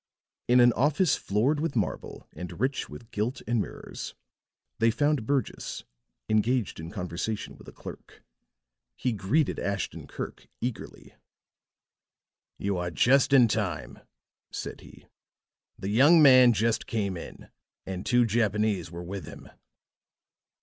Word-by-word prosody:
In 125 +1 +5
an 120 -1 +6
office 145 +6 +2
floored 120 +10 +1
with 155 -3 -2
marble 105 -5 -3
and 90 +1 -8
rich 130 +3 -1
with 115 -2 -11
gilt 110 +5 -2
and 120 -2 +1
mirrors, - - -7 0.6
they 115 0 +4
found 145 -1 +1
Burgess, 135 -6 -2 0.4
engaged 110 0 +1
in 80 0 -6
conversation 90 +3 -4
with - - -16
a - - -9
clerk. - - -11 0.7
He 125 - -1
greeted 115 +9 0
Ashton 100 0 -3
Kirk - - -7
eagerly. 120 -1 -6 1.4
"You 100 -1 -1
are 90 0 -2
just 125 - +3
in 130 -4 +7
time," - - -3 0.5
said - - -6
he. - - -15 0.7
"The 95 - -4
young 140 +10 +6
man 130 -4 +8
just 110 +2 0
came 100 -4 -1
in, 85 - -10 0.4
and 95 0 -5
two 120 0 +3
Japanese 105 -3 +1
were 85 +1 -7
with 95 +2 -6
him." - - -11
115 Hz, 130 wpm, -28 LUFS, 100-130 Hz, 1.4 s, man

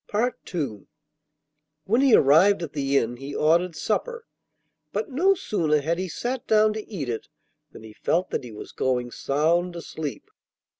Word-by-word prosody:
II 140 - -4 1.0
When 230 +9 +2
he 275 -4 +6
arrived 170 +7 +5
at 155 - -6
the 140 -1 +1
inn 120 -1 0
he 140 +2 -7
ordered 170 +2 +2
supper, 465 - -2 0.7
but 450 - -3
no 370 +9 +3
sooner 160 - 0
had 165 +4 -1
he 185 0 -3
sat 245 +8 -4
down 215 0 +4
to 215 -1 -7
eat 160 -10 -4
it 115 -2 -4 0.4
than - - -12
he 110 -1 -11
felt 175 +10 -1
that - - -2
he 120 - -9
was 105 - -9
going 125 -2 -1
sound 170 +7 0
asleep. 160 -3 -6
165 Hz, 160 wpm, -25 LUFS, 140-210 Hz, 1.0 s, he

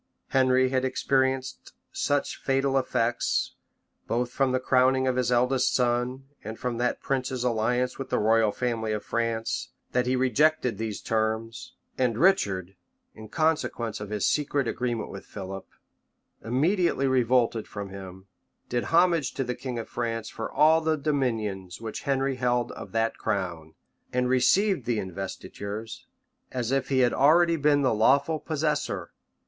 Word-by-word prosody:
Henry 130 -1 +3
had 130 0 0
experienced 130 0 -1 0.2
such 145 -1 -1
fatal 135 0 +1
effects, 120 -3 0 0.5
both 120 +1 -1
from 135 -1 +1
the 130 - +1
crowning 130 +1 +3
of 130 -1 +1
his 125 -1 0
eldest 125 +1 +2
son, 125 +1 0 0.2
and 110 +1 -6
from 125 -2 -3
that 125 0 0
prince's 130 -2 -2
alliance 125 +2 0
with 135 - -5
the - - +1
royal 110 0 +3
family 115 -2 -2
of 105 - -4
France, 115 -1 -2 0.2
that 125 0 +1
he 130 - +2
rejected 130 -2 +2
these 110 -2 -4
terms; 110 +1 -2 0.3
and 120 -4 +1
Richard, 100 - +2 0.4
in 110 -1 -11
con 160 0 +3
sequence 115 -6 -4
of 105 -1 -7
his 105 -2 -1
secret 145 -3 0
agreement 120 -2 -2
with 100 - -8
Philip, 95 -1 -8 0.8
immediately 155 - +1
revolted 125 -3 +2
from 100 -1 -6
him, 95 -1 -10 0.4
did 120 0 -1
homage 170 -4 +2
to 135 - -1
the 125 -1 -2
king 125 -1 -5
of 115 - -5
France 115 -2 -3
for 115 - -6
all 160 +2 +5
the 160 -1 +1
dominions 115 - -2
which 110 -1 -6
Henry 135 -1 +1
held 125 -1 0
of - - -9
that 115 0 0
crown, 90 -7 -3 0.4
and 125 0 +1
received 135 - +3
the 120 -2 0
investitures, 100 +3 -6 0.4
as 125 -1 -2
if 135 -1 0
he 130 -2 +3
had 120 -1 +3
already 165 +5 +4
been 145 -2 +3
the 130 - +3
lawful 140 +8 +3
possessor. 150 -1 -2
125 Hz, 155 wpm, -27 LUFS, 115-135 Hz, 0.8 s, all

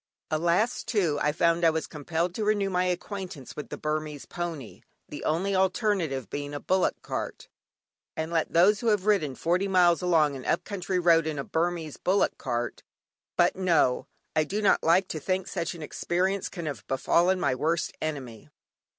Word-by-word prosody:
Alas! 170 +9 +1
too, 185 -11 0
I 150 - +2
found 170 +2 +2
I 165 - +7
was 160 0 -1
compelled 165 +4 -2
to 215 - -3
renew 205 -2 +1
my 180 0 +1
acquaintance 180 - -4
with 150 - -7
the - - -5
Burmese 150 -1 -3
pony, 165 -8 -6 0.3
the - - -8
only 185 +6 0
alternative 185 - +1
being 145 +4 -5
a - - -3
bullock 185 +4 +1
cart; - - -5 0.7
and 160 +1 -3
let 165 -2 0
those 195 +5 +5
who 235 - -3
have 210 -3 +2
ridden 165 -11 +2
forty 180 +7 +1
miles 180 -3 +4
along 160 -5 +3
an 130 - -7
up - - 0
country 190 -2 -3
road 165 -2 +4
in 155 -2 -3
a 140 - -2
Burmese 165 -1 -2
bullock 195 +2 +1
cart 120 -2 -3 0.6
but - - +4
no! 170 -9 +2 0.3
I 155 - +4
do 195 +7 -3
not 205 - +3
like 180 +4 +3
to 155 - -3
think 185 +4 -1
such 165 - -3
an 165 - -8
experience 185 +5 -1
can 170 -3 -6
have 145 -3 -5
befallen 175 +7 +2
my 140 -7 +1
worst 160 +6 -1
enemy. 130 - -5
170 Hz, 180 wpm, -27 LUFS, 150-185 Hz, 0.7 s, I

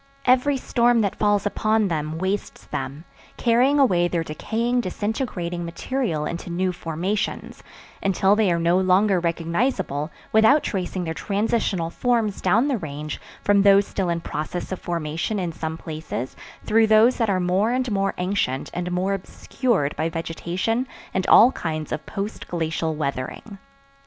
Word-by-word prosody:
Every 260 +3 +4
storm 240 -2 +2
that 200 -3 -1
falls 205 -1 +2
upon 215 +1 +1
them 155 -2 -2
wastes 190 +3 -3
them, 145 +5 -5 0.3
carrying 250 +4 +3
away 180 -11 +4
their 170 -1 -1
decaying, 230 +10 -1
disintegrating 185 -4 -3
material 170 - -2
into 170 +3 -5
new 180 +2 0
formations, 175 +5 -3 0.4
until 195 +1 +3
they 210 -4 +2
are 170 - +2
no 170 +2 +3
longer 190 +1 +3
recognizable 170 - -1 0.2
without 220 +7 +5
tracing 185 -2 -2
their 160 -1 -3
transitional 200 -3 -1
forms 230 -4 0
down 215 +9 +3
the 265 -6 0
Range 150 -2 -6 0.2
from 205 -1 +4
those 200 0 +6
still 190 -3 -2
in 170 0 -1
process 155 +4 -4
of 190 - -3
formation 170 +4 -2
in 180 -3 -2
some 160 0 -5
places 155 -6 -5 0.3
through 225 +1 +4
those 220 +3 +5
that 230 -3 +1
are 190 -2 +2
more 185 +4 +1
and 250 0 0
more 195 -1 0
ancient 180 -8 -1
and 180 0 -3
more 185 +2 0
obscured 195 - -1
by 160 +1 -1
vegetation 175 +9 -2 0.3
and 190 - -1
all 240 +4 +8
kinds 155 -8 -4
of 155 - -3
post 200 +2 -5
glacial 160 -1 -2
weathering. 150 - -4
190 Hz, 150 wpm, -23 LUFS, 165-220 Hz, 0.4 s, all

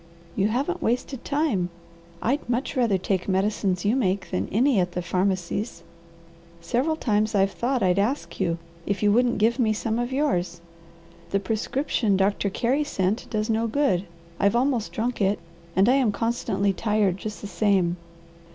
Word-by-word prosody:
"You 200 +1 +2
haven't 280 +11 -1
wasted 250 +2 -1
time! 280 - 0 0.5
I'd 255 +2 0
much 250 +4 -1
rather 235 -7 +2
take 185 +1 -2
medicines 190 -1 0
you 215 +4 +3
make 195 -6 0
than 95 +2 -1
any 245 +1 +3
at 180 -1 0
the 180 - -2
pharmacies. 185 +1 -1 0.8
Several 255 - 0
times 215 -6 0
I've 195 0 +3
thought 250 +2 -1
I'd 180 +1 +3
ask 245 +8 -1
you 170 -3 0 0.3
if 200 +1 -1
you 205 - +5
wouldn't 240 +2 +3
give 230 +4 +2
me 220 -3 +3
some 220 +1 -1
of 240 +1 -2
yours. 180 - 0 0.7
The 195 - +1
prescription 220 +1 0
Doctor 200 +1 +1
Carey 255 +9 +1
sent 205 -6 -1
does 215 -1 -1
no 225 0 +1
good. 225 -7 +1 0.3
I've 200 +3 +3
almost 245 -3 +1
drunk 235 +1 -2
it, 200 +1 +2 0.4
and 195 +3 +4
I 255 +3 +5
am 250 -6 +3
constantly 200 -3 0
tired, 210 -2 +1
just 210 +2 -6
the - - -7
same. 195 -5 +2
215 Hz, 165 wpm, -25 LUFS, 195-245 Hz, 0.8 s, you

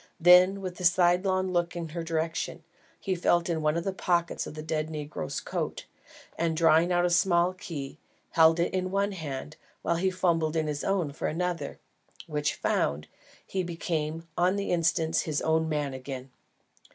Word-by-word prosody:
Then, 180 +3 +6
with 185 -1 -6
a - - -6
side 175 +1 +4
long 185 -1 +1
look 175 -1 0
in 170 -2 -4
her 170 +2 -4
direction, 165 0 -2 0.4
he 190 - -1
felt 175 -1 +2
in 165 -2 0
one 155 +1 +1
of 170 - -2
the 195 - -2
pockets 175 -2 0
of - - -8
the 155 - -6
dead 155 0 -2
negro's 150 - -4
coat, - - -4 0.5
and 165 -1 0
drawing 165 +1 +4
out 175 0 +3
a - - +2
small 175 0 +3
key, 150 -7 -7 0.3
held 160 0 +5
it 170 - 0
in 185 0 -1
one 200 +2 0
hand 155 -4 -6 0.3
while 170 - +1
he 190 +2 +1
fumbled 170 -4 +1
in 160 -1 +1
his 150 -1 -3
own 185 -7 0
for - - -3
another, 175 +2 -2 0.5
which 150 -1 -1
found, 75 +2 -1 0.4
he 190 - -2
became 165 -2 -3
on 180 +2 +2
the 200 0 -2
instant 165 -1 +1
his 155 -2 0
own 160 0 +1
man 145 -3 -1
again. 130 0 -7
170 Hz, 180 wpm, -28 LUFS, 155-180 Hz, 0.5 s, Then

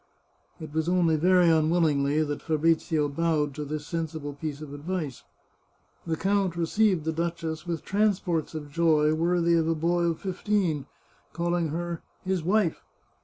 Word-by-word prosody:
It 155 -2 -8
was 160 +1 0
only 175 -3 +3
very 180 +2 +4
unwillingly 155 -2 +3
that 145 -1 -4
Fabrizio 160 -1 +1
bowed 150 -1 0
to 150 - -5
this 150 +1 -5
sensible 160 -3 -4
piece 145 0 -5
of 150 -2 -8
advice. 150 -2 -4 0.9
The 160 -1 -1
count 195 -2 +1
received 175 0 +1
the 160 - +1
duchess 165 0 -3
with 170 -2 -3
transports 190 -6 0
of 150 -2 -6
joy 155 -1 +3
worthy 170 +1 +2
of 165 -1 +2
a 165 - +1
boy 170 +2 +1
of 165 -2 0
fifteen, 185 -6 -1 0.5
calling 170 0 0
her 170 +2 -4
" - - -37
his 185 -2 0
wife." 185 0 +1
165 Hz, 155 wpm, -27 LUFS, 155-175 Hz, 0.9 s, very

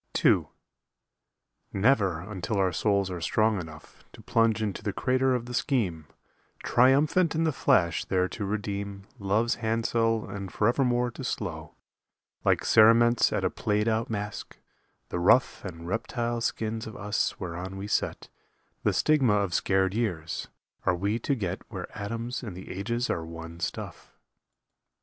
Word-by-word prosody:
II - - +5 1.2
Never 100 -6 +2
until 100 +2 -4
our 95 -2 +2
souls 100 +1 +1
are 90 -2 -5
strong 110 +3 +2
enough 80 -2 -12
To - - -13
plunge 115 -1 +2
into 105 -1 -3
the 105 -2 -2
crater 130 0 +2
of 120 -1 -3
the 125 - -7
Scheme 100 - 0 0.6
Triumphant 145 +8 +4
in 160 - +1
the 160 - +2
flash 85 - +2
there 90 -1 +1
to 105 - -5
redeem 100 -1 -3 0.2
Love's 105 +4 +1
handsel 115 0 +1
and 100 -2 -6
forevermore 120 +2 +2
to - - -8
slough, - - -4 0.7
Like - - +2
cerements 115 +2 +6
at - - -1
a - - +1
played 105 +1 0
out 115 +2 0
masque, 105 -2 -5 0.5
the 90 - -2
rough 110 +9 +3
And 85 -3 -7
reptile 115 +3 -2
skins 110 0 -2
of 110 - -8
us 105 0 -1
whereon 90 +2 -5
we 95 - -5
set 105 - -1 0.5
The - - +1
stigma 135 -8 +3
of 100 -3 0
scared 95 0 +2
years 90 -9 -2 0.4
are 90 - +2
we 100 +6 -1
to 140 - 0
get 95 -6 -3
Where 95 -5 -7
atoms 115 +4 -4
and 105 -8 -7
the 95 - -8
ages 115 +6 -2
are 85 - -2
one 85 0 -9
stuff. - - -6
105 Hz, 150 wpm, -28 LUFS, 95-115 Hz, 1.2 s, cerements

